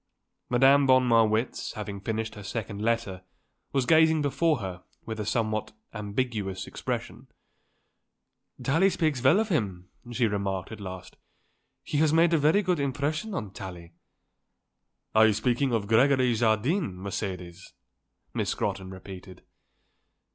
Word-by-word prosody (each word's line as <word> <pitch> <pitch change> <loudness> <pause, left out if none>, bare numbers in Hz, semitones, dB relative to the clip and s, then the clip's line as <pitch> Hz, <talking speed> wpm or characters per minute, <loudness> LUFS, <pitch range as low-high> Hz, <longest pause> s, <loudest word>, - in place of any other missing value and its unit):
Madame 135 +3 +5
von 130 -1 +5
Marwitz, 115 0 +2
having 100 -3 -6
finished 110 +1 -3
her 105 - -10
second 105 +1 -5
letter, 115 -5 -1 0.5
was 135 -2 +1
gazing 160 +2 +5
before 150 +2 +1
her 95 -5 -6 0.2
with 110 -1 -5
a 105 - -3
somewhat 110 -1 -1 0.2
ambiguous 105 -3 -3
expression. - - -5 1.4
"Tallie 165 +8 +3
speaks 160 -8 0
well 155 +10 +5
of 220 0 -1
him," 95 - -2 0.2
she 120 0 +1
remarked 100 -3 -2
at 110 - -8
last. 95 -1 -8 0.7
"He 145 - -2
has 155 -1 +4
made 165 +1 +4
a 165 - +4
very 155 +8 +3
good 180 -4 +1
impression 145 +8 -2
on 100 - -5
Tallie." 90 -4 -9 1.2
"Are 110 0 +6
you 110 - +3
speaking 125 +5 0
of 115 -3 0
Gregory 125 +3 +4
Jardine, 115 - +1
Mercedes?" 95 -2 -6 0.6
Miss - - -1
Scrotton 95 -1 -2
repeated. 95 0 -11
115 Hz, 135 wpm, -27 LUFS, 100-140 Hz, 1.4 s, Are